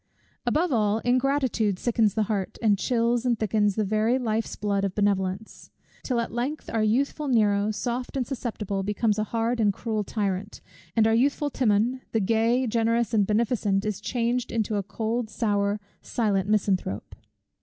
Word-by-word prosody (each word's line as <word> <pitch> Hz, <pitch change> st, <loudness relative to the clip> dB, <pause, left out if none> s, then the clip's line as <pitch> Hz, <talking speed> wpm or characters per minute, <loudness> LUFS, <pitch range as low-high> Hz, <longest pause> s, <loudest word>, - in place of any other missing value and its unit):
Above 315 Hz, +7 st, +2 dB
all, 210 Hz, -2 st, +2 dB
ingratitude 250 Hz, -5 st, +1 dB
sickens 225 Hz, -2 st, +1 dB
the 220 Hz, -, +2 dB
heart, 200 Hz, -3 st, -3 dB
and 210 Hz, -4 st, +2 dB
chills 235 Hz, 0 st, +1 dB
and 245 Hz, -2 st, +1 dB
thickens 210 Hz, -2 st, +1 dB
the 215 Hz, -, +1 dB
very 215 Hz, +4 st, +1 dB
life's 225 Hz, -3 st, -2 dB
blood 200 Hz, -1 st, -1 dB
of 195 Hz, -2 st, -2 dB
benevolence: 200 Hz, 0 st, -1 dB, 0.3 s
till 250 Hz, -3 st, -1 dB
at 230 Hz, -, -3 dB
length 255 Hz, +6 st, -3 dB
our 225 Hz, -, +1 dB
youthful 275 Hz, +7 st, +1 dB
Nero, 210 Hz, -4 st, +3 dB
soft 240 Hz, +5 st, -3 dB
and 255 Hz, -, 0 dB
susceptible, 215 Hz, -7 st, -3 dB
becomes 210 Hz, +2 st, 0 dB
a 215 Hz, -, 0 dB
hard 230 Hz, +2 st, -1 dB
and 210 Hz, -2 st, +4 dB
cruel 215 Hz, +1 st, -2 dB
tyrant; 200 Hz, -1 st, -3 dB, 0.4 s
and 225 Hz, -1 st, +4 dB
our 225 Hz, -, +3 dB
youthful 280 Hz, +4 st, +1 dB
Timon, 240 Hz, +1 st, +1 dB
the 225 Hz, -, +3 dB
gay, 225 Hz, +4 st, +2 dB
the 260 Hz, -, -1 dB
generous, 230 Hz, 0 st, +1 dB
the 220 Hz, -, +2 dB
beneficent, 210 Hz, -1 st, +1 dB
is 210 Hz, -3 st, -3 dB
changed 245 Hz, 0 st, -1 dB
into 220 Hz, -2 st, -1 dB
a 200 Hz, -, +1 dB
cold, 220 Hz, +3 st, -3 dB
sour, 205 Hz, -2 st, 0 dB, 0.2 s
silent 200 Hz, -4 st, 0 dB
misanthrope. 195 Hz, -, 0 dB
220 Hz, 165 wpm, -26 LUFS, 205-240 Hz, 0.4 s, and